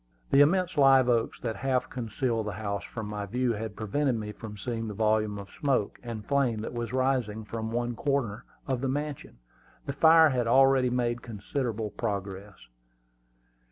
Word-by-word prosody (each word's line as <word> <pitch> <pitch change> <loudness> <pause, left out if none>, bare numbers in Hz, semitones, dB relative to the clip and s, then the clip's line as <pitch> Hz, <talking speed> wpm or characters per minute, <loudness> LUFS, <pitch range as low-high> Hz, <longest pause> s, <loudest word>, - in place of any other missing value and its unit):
The 140 - +7
immense 175 +3 +3
live 135 -2 +6
oaks 115 -2 +1
that 115 -4 -3
half 130 0 0
concealed 115 -1 -2
the 105 - -3
house 100 0 -3
from 110 -2 -6
my 105 -1 -4
view 125 +3 0
had 110 -1 -5
prevented 125 +6 0
me 105 -2 -4
from 105 0 -9
seeing 115 +2 -3
the 105 - -5
volume 110 -1 +1
of 100 0 -9
smoke 135 -8 -1
and 115 -3 -6
flame 130 -5 +1
that 110 - -5
was 120 -2 -4
rising 125 -5 0
from 110 +1 -4
one 120 0 -1
corner 130 -6 -1 0.2
of 130 -2 -1
the 135 - 0
mansion. 145 +1 -4 0.5
The 140 - -3
fire 160 +2 +7
had 125 -4 0
already 135 +1 +5
made 120 -1 -1
considerable 115 0 -3
progress. 100 -2 -4
120 Hz, 170 wpm, -28 LUFS, 105-130 Hz, 0.5 s, The